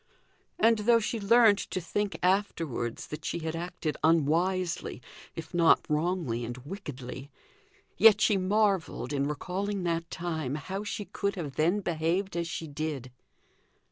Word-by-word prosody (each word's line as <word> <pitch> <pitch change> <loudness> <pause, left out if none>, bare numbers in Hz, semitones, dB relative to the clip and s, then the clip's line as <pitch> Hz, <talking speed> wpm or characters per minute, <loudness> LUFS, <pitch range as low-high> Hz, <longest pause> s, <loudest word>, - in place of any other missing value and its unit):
And 225 -1 +4
though 230 +2 +5
she 225 +1 -2
learnt 215 0 +5
to - - -3
think 200 +4 -2
afterwards 165 - 0
that 150 - -7
she - - -2
had 160 -1 -3
acted 170 -2 -4
unwisely, 165 +3 +1 0.4
if 165 +1 -8
not 170 -2 +4
wrongly 150 -6 -1
and 120 +1 -5
wickedly, 140 -4 -8 0.7
yet 220 -2 +7
she 215 - +4
marvelled, 195 - +1
in 140 0 0
recalling 190 +6 -3
that 170 -1 -1
time, 160 -6 -3
how 190 +7 -4
she 205 0 -4
could 200 +1 -2
have 150 -7 -5
then 175 +7 +2
behaved 175 +3 -1
as 170 -1 -1
she 165 -1 -5
did. 145 -4 -4
170 Hz, 140 wpm, -29 LUFS, 150-195 Hz, 0.7 s, yet